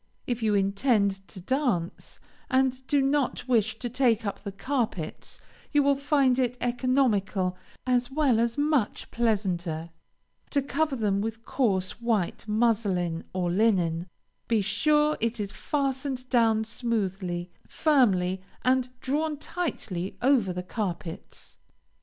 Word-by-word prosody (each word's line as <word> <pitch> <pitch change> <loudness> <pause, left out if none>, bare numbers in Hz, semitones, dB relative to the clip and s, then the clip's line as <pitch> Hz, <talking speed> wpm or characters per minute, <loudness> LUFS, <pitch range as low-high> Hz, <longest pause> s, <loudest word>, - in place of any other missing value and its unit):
If 245 -1 -2
you 215 -2 +2
intend 200 -1 +1
to 195 - -10
dance, 205 - -2 0.3
and 260 0 +1
do 285 -2 +3
not 275 -2 0
wish 220 -3 +2
to 245 - -4
take 240 -3 +2
up 200 - -3
the 200 - -5
carpets, 225 - -3 0.3
you 290 -1 +4
will 280 0 +4
find 275 -2 +2
it 250 -1 0
economical, 240 -7 +1 0.3
as 250 -1 +1
well 270 -5 +2
as 235 +2 0
much 290 -6 0
pleasanter, 180 -8 -1 0.6
to 285 - +1
cover 290 +1 0
them 205 -4 0
with 225 +1 -5
coarse 195 -5 0
white 225 -3 -1
muslin 205 -7 +1
or 180 -2 -1
linen; 180 -4 +2 0.4
be 225 -2 +2
sure 300 +9 +2
it 230 0 -1
is 200 -1 -3
fastened 265 0 -2
down 225 -3 +3
smoothly, 195 -6 -2 0.2
firmly, 190 - +2 0.2
and 255 0 +3
drawn 300 +3 -1
tightly 275 - -4
over 250 -8 +3
the 180 0 -4
carpets. 180 -4 -6
230 Hz, 130 wpm, -27 LUFS, 195-265 Hz, 0.6 s, you